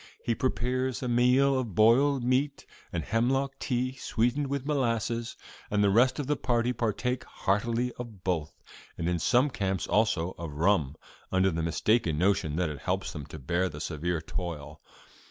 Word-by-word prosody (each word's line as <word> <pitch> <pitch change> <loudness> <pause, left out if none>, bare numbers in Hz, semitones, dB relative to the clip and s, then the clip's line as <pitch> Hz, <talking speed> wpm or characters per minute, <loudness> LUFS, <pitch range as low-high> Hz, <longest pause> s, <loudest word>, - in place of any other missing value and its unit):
He 120 - +1
prepares 130 +1 -1
a - - -1
meal 125 +3 +4
of 115 -8 -4
boiled 125 +5 +4
meat 135 +3 0 0.3
and - - -2
the - - -11
hemlock 135 +5 0
tea 130 0 -1
sweetened 125 +5 0
with 140 -1 -3
molasses, 115 -5 -1 0.3
and 105 0 +2
the 100 - +4
rest 125 +5 +4
of 145 - -2
the 150 +2 +1
party 120 -1 0
partake 120 +2 -1
heartily 115 +5 -1
of 110 -6 -8
both, 80 -5 -2 0.3
and 85 - -2
in 90 -1 0
some 130 - +3
camps 95 -5 -1
also 105 -6 +1
of 85 -3 -5
rum, 80 -4 +2 0.4
under 95 +1 +3
the 80 0 -2
mistaken 85 +1 +1
notion 85 -4 +1
that 90 -1 0
it 75 - -7
helps 95 +1 -2
them 75 -4 -7
to - - -9
bear 85 +7 0
the 75 - -9
severe 80 +2 -2
toil. 80 -3 -6
115 Hz, 170 wpm, -28 LUFS, 90-125 Hz, 0.4 s, meal